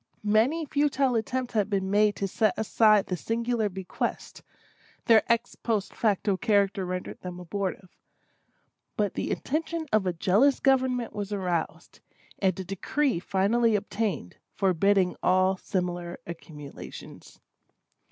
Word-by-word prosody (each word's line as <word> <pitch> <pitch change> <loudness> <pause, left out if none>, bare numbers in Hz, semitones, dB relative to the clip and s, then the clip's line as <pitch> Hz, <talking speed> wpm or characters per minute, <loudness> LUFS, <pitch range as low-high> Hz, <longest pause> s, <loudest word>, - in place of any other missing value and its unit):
Many 230 +10 +2
futile 280 -2 +1
attempts 245 +2 -2
had 210 -2 +1
been 195 -2 -1
made 210 0 +3
to 195 - -2
set 215 +1 +1
aside 215 -1 +4
this 180 -3 -4
singular 230 -1 0
bequest; 190 -1 -4 0.6
their 225 -3 +6
ex 235 - +1
post 215 -4 -2
facto 205 -2 +1
character 200 -2 +1
rendered 180 0 -5
them 180 -1 -7
abortive; 185 +1 -4 1.0
but 205 -3 0
the - - -3
attention 325 +3 -2
of 210 -3 +3
a 180 - 0
jealous 205 +11 +3
government 260 -3 +1
was 205 -1 -5
aroused, 180 -5 -3 0.4
and 190 -2 +1
a - - -3
decree 195 - -1
finally 210 +5 +2
obtained, 205 - -3 0.2
forbidding 190 0 +2
all 185 +1 +3
similar 175 -2 -3
accumulations. 150 -4 -10
205 Hz, 125 wpm, -27 LUFS, 185-230 Hz, 1.0 s, their